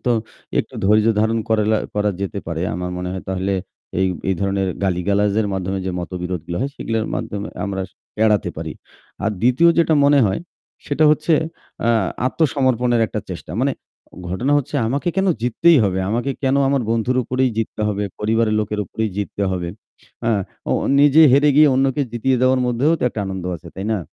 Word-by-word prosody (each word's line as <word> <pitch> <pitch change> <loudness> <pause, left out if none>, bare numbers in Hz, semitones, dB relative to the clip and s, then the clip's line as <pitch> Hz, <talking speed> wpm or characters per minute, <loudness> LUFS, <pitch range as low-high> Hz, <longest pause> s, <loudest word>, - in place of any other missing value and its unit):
তো 125 - +1 0.5
একটু - - -2
ধৈর্য 105 +2 +4
ধারণ 110 +1 +1
করেলা 110 0 +2 0.2
করা 105 0 +1
যেতে 100 +1 -3
পারে। 85 0 -3
আমার 90 0 -3
মনে 90 - -4
হয় 95 - -5
তাহলে 95 +1 -1 0.5
এই 95 - +3 0.2
এই 95 - +2
ধরনের 95 -1 0 0.2
গালিগালাজের 100 +3 +1
মাধ্যমে 95 0 -2
যে 95 - -1
মতবিরোধগুলো 90 -1 -4
হয় 140 +1 -1
সেগুলোর 115 -1 -2
মাধ্যমে 100 0 -4 0.2
আমরা 95 -1 -3 0.4
এড়াতে 105 -4 +2
পারি। 80 -1 -5 0.5
আর 110 - +2
দ্বিতীয় 130 +8 +5
যেটা 165 -1 +4
মনে 145 0 +5
হয় 95 +8 -1 0.5
সেটা 150 +1 +2
হচ্ছে 155 +2 +2 0.5
আ - - +3 0.4
আত্মসমর্পণের 130 -5 +1
একটা 105 - -4
চেষ্টা। 90 - -7
মানে 140 +1 +2 0.6
ঘটনা 120 +11 0
হচ্ছে 145 +1 -6
আমাকে 140 +9 -1
কেন 195 0 +2 0.2
জিততেই 160 +7 +4
হবে, 95 -1 0
আমাকে 120 +4 -1
কেন 135 0 +2
আমার 135 -3 +1
বন্ধুর 115 +2 +1
উপরেই 130 +1 +1
জিততে 110 -1 -2
হবে, 105 0 -1 0.2
পরিবারের 110 0 +1
লোকের 105 0 -2
উপরেই 110 +4 -3
জিততে 100 0 -3
হবে। 90 -2 -3 0.6
আ - - +3 0.4
ও - - +3 0.3
নিজে 145 +2 +6
হেরে 145 +2 +5
গিয়ে 150 -1 +7
অন্যকে 135 +2 +1
জিতিয়ে 130 +3 +1
দেওয়ার 130 0 +3
মধ্যেও 125 +6 +2
তো - - -6
একটা 110 - -5
আনন্দ 95 -2 -5
আছে। 85 +1 -13
তাই 95 - -4
না? 110 - 0
110 Hz, 175 wpm, -20 LUFS, 95-130 Hz, 0.6 s, গিয়ে